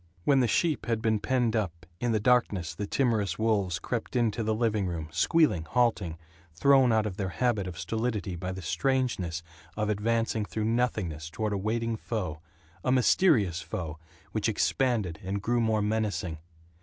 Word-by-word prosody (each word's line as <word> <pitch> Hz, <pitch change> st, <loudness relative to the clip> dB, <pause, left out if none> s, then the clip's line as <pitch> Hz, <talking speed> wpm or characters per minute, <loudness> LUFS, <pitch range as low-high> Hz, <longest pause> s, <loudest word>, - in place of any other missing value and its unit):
When 135 Hz, +6 st, +4 dB
the 125 Hz, -, +3 dB
sheep 155 Hz, +6 st, +1 dB
had 115 Hz, -2 st, +1 dB
been 110 Hz, -1 st, +1 dB
penned 120 Hz, -1 st, +1 dB
up, 90 Hz, -5 st, -2 dB
in 120 Hz, -1 st, 0 dB
the 110 Hz, -, +2 dB
darkness 105 Hz, -7 st, +2 dB
the 105 Hz, -, -4 dB
timorous 105 Hz, -9 st, +1 dB
wolves 100 Hz, -6 st, +1 dB
crept 115 Hz, +7 st, -4 dB
into 115 Hz, -2 st, +1 dB
the 110 Hz, 0 st, 0 dB
living 110 Hz, -4 st, +1 dB
room, 80 Hz, -3 st, -4 dB
squealing, 145 Hz, -, +3 dB
halting, 110 Hz, -8 st, +1 dB, 0.4 s
thrown 135 Hz, +6 st, +5 dB
out 110 Hz, -1 st, +3 dB
of 100 Hz, -3 st, -4 dB
their 95 Hz, -2 st, -2 dB
habit 110 Hz, -1 st, 0 dB
of 90 Hz, -2 st, -7 dB
stolidity 110 Hz, -5 st, -2 dB
by 90 Hz, +2 st, -4 dB
the 95 Hz, 0 st, -6 dB
strangeness 100 Hz, -, 0 dB, 0.3 s
of 105 Hz, -1 st, 0 dB
advancing 115 Hz, +1 st, 0 dB
through 105 Hz, +1 st, -3 dB
nothingness 105 Hz, -10 st, -1 dB
toward 105 Hz, +4 st, -2 dB
a -, -, 0 dB
waiting 115 Hz, +2 st, -1 dB
foe, 90 Hz, -10 st, -4 dB, 0.4 s
a 130 Hz, -, +1 dB
mysterious 120 Hz, -, +3 dB
foe 80 Hz, -3 st, -5 dB, 0.3 s
which 110 Hz, +1 st, 0 dB
expanded 110 Hz, -6 st, 0 dB
and 95 Hz, +1 st, -3 dB
grew 120 Hz, 0 st, +1 dB
more 110 Hz, -2 st, +1 dB
menacing. 105 Hz, -6 st, -1 dB
110 Hz, 170 wpm, -28 LUFS, 95-120 Hz, 0.4 s, thrown